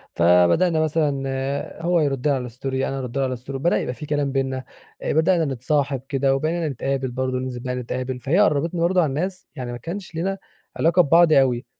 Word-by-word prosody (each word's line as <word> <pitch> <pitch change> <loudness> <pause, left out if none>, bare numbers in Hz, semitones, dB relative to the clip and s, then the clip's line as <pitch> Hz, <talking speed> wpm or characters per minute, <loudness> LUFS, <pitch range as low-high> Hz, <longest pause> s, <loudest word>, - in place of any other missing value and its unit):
فبدأنا 90 - +4
مثلًا 140 -2 -1
هو 175 0 +2
يرد 140 -2 0
على 130 -4 0
الstory 125 +4 -15
أنا 135 0 -1
أرد 125 +1 -5
له 135 - +2
على 130 -1 -1
الstory 130 +3 -10
بدأ 135 +6 +1
يبقى 125 - -3
في 150 - -8
كلام 145 -2 -1
بيننا، 130 -1 -2 0.4
آآ - - -1
بدأنا 165 +1 +3
نتصاحب 135 0 -1
كده 135 -1 +2
وبقينا 160 +3 -1
نتقابل 135 0 -2
برضه 130 0 -2
ننزل 130 -1 -4
بقى 125 0 -2
نتقابل، 125 +1 -4
فهي 155 +10 +1
قربتنا 165 -2 +2
برضه 180 +1 +3
عن 140 -3 -1
ناس 185 +5 -3
يعني 125 -2 -5
ما 120 - -5
كانش 170 - -7
لينا 195 +4 -1 0.4
علاقة 170 +3 +4
ببعض 165 +1 +5
أوي، 130 -2 +3
135 Hz, 195 wpm, -22 LUFS, 130-160 Hz, 0.4 s, ببعض